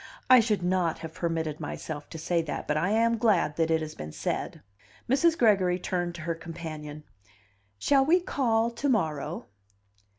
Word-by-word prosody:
"I 255 - +10
should 215 -5 +1
not 180 -2 +1
have 160 -1 -8
permitted 160 -3 -2
myself 145 -2 -6
to - - -8
say 170 +2 0
that, 155 -2 -5
but 150 - 0
I 170 +5 +1
am 230 +2 +2
glad 190 -10 +2
that 165 -1 +1
it 160 0 +2
has 155 -1 -5
been 75 0 -8
said." - - -4 0.4
Mrs. 325 +6 +3
Gregory 190 -6 +3
turned 175 -1 -2
to 170 - -8
her 165 +1 -2
companion. 155 -3 -8 0.7
"Shall 270 - +3
we 335 +6 +4
call 235 -9 0
to 270 +5 -2
morrow?" 160 - -1
175 Hz, 170 wpm, -28 LUFS, 160-225 Hz, 0.7 s, I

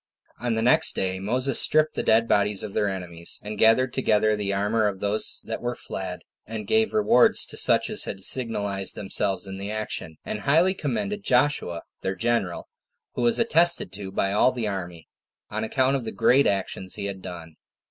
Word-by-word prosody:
5. 120 - -5
On 120 - +1
the 110 - -1
next 125 - +4
day, 95 0 -1
Moses 125 +6 +3
stripped 155 0 +5
the - - -2
dead 115 +1 +3
bodies 100 -1 +1
of 105 -2 -6
their 105 - 0
enemies, 85 -3 -4
and 105 +1 -6
gathered 115 +4 +3
together 110 -4 +2
the 105 -1 -2
armor 105 +2 +1
of 100 -2 -4
those 105 +2 -1
that 110 - -5
were 120 0 -3
fled, 95 -5 -7 0.2
and 110 -1 -6
gave 220 0 +2
rewards 210 - +4
to - - -7
such - - +3
as - - +2
had 95 - -6
signalized 100 -5 -2
themselves 100 0 -2
in 95 0 -8
the 100 +1 -5
action; 105 -7 -4
and 105 - -4
highly 160 - +3
commended 200 - -3
Joshua, 125 - +1 0.2
their 95 - -3
general, 95 -3 -1 0.5
who - - -4
was 120 -1 +2
attested 175 - +2
to 95 -1 -7
by 100 0 -1
all 110 +5 +4
the 120 -4 -3
army, 90 -5 -6 0.4
on - - -3
account 130 +4 +1
of 135 - -2
the 110 - -5
great 140 +3 +3
actions 95 -1 -3
he 100 - -5
had 100 -1 -6
done. 85 -3 -9
105 Hz, 195 wpm, -24 LUFS, 95-125 Hz, 0.5 s, stripped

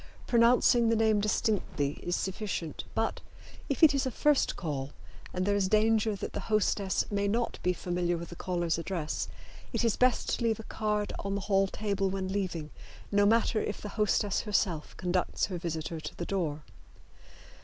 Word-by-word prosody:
Pronouncing 235 0 +4
the 230 - +3
name 220 -1 +3
distinctly 200 -8 0
is 175 - -1
sufficient, 190 -4 -3
but, - - -1 0.5
if 280 - -1
it 300 -2 +9
is 275 -1 +1
a - - +1
first 290 +4 +2
call, 145 -4 -4 0.4
and 185 0 -1
there 200 0 +2
is 200 -2 +2
danger 215 0 +3
that 195 - -6
the - - -2
hostess 205 -2 +1
may 200 0 +1
not 230 +3 -1
be 180 - +2
familiar 175 -1 -1
with 170 0 -7
the 170 - -8
caller's 175 -2 -1
address, 165 -3 -3 0.4
it - - 0
is 230 - +2
best 255 0 +2
to - - -2
leave 225 -2 +1
a - - -6
card 210 -1 -2
on 200 0 -2
the 200 - -2
hall 195 -1 +2
table 200 -1 -1
when 190 0 -3
leaving, 170 -6 -2 0.4
no 205 0 +4
matter 225 0 +3
if 205 - -3
the 210 - -6
hostess 210 -1 +1
herself 190 -7 -1
conducts 180 0 0
her 185 -3 -5
visitor 165 -1 -4
to 150 - -7
the 170 - -3
door. 160 -6 -2
200 Hz, 180 wpm, -30 LUFS, 175-215 Hz, 0.5 s, it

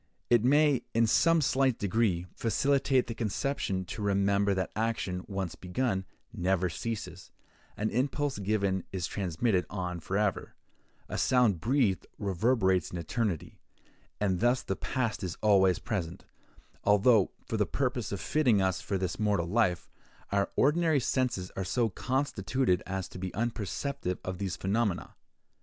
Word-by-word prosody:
It 120 -2 +5
may, 145 +1 +4
in 115 0 +5
some 155 +9 +4
slight 135 -3 +2
degree, 100 -4 +1
facilitate 135 +3 +2
the 115 - -5
conception 110 -3 -2
to 95 - -6
remember 100 0 +2
that 95 0 -2
action, 105 -5 -1
once 95 -4 -3
begun, 95 +1 -2 0.3
never 90 0 +1
ceases—an 110 0 -6
impulse 135 +1 -1
given 100 -2 0
is 95 -3 -2
transmitted 95 +1 0
on 90 -3 -4
for 95 +5 -2
ever; 105 -2 -1 0.5
a - - -3
sound 120 -8 +3
breathed 110 - +1
reverberates 95 -2 +1
in 90 - -6
eternity; 85 0 -3 0.6
and 95 -4 +1
thus 120 +2 +2
the 95 - -2
past 120 -1 -2
is 90 -2 -4
always 95 -4 +4
present, 90 -7 -4 0.6
although, 105 0 +4 0.2
for 110 - -2
the 105 -3 +1
purpose 125 +3 -1
of 100 - -3
fitting 125 -7 +2
us 95 -1 0
for 95 +1 -2
this 95 +1 -3
mortal 105 -5 +1
life, 90 -2 +1 0.4
our 100 0 +1
ordinary 155 +1 +3
senses 125 -8 -1
are 95 - -2
so 115 +5 +1
constituted 125 -4 0
as 95 -1 -3
to - - -10
be 95 0 -4
unperceptive 115 -1 -2
of 95 -1 -5
these 95 -2 -2
phenomena. 100 -1 -1
105 Hz, 145 wpm, -30 LUFS, 95-120 Hz, 0.6 s, It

